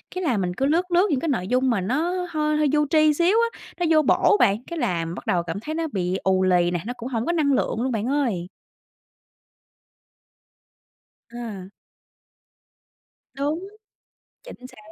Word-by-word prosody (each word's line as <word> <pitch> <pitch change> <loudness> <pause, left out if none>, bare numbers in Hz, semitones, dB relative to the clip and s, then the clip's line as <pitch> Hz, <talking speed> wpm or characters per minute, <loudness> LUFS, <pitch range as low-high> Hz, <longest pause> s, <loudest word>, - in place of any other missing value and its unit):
cái 370 - -3
là 255 -9 +1
mình 180 -2 -1
cứ 265 - -1
lướt, 345 +5 +1
lướt 360 +4 +4
những 285 -6 +1
cái 330 - -3
nội 205 -10 -1
dung 255 +3 +1
mà 230 -6 +1
nó 330 - -1
hơi 305 -2 0
hơi 305 - +2
vô 300 0 +3
tri 310 -1 +4
xíu 345 +7 +2 0.2
á, - - -15 0.2
nó 350 - +1
vô 310 -1 +5
bổ 310 +7 +3
bạn, 205 +4 +2
cái 340 -1 -5
là 170 - -1
bắt 170 +2 -7
đầu 175 -1 +1
cảm 170 +3 -5
thấy 305 +9 -5
nó 325 0 -1
bị 185 -1 -1
ù 190 0 +2
lì 175 -1 +3
nè, 175 - -1
nó 245 - -3
cũng 245 +2 -6
hổng 230 -2 -2
có - - 0
năng 305 -5 +2
lượng 235 - 0
luôn 260 +1 -1
bạn 220 -2 -2
ơi. 240 -11 -1 2.8
À. 220 -6 -7 1.7
Đúng, 300 +7 -3 0.8
chính 375 - -12
xác. - - -18
260 Hz, 185 wpm, -23 LUFS, 190-315 Hz, 2.8 s, vô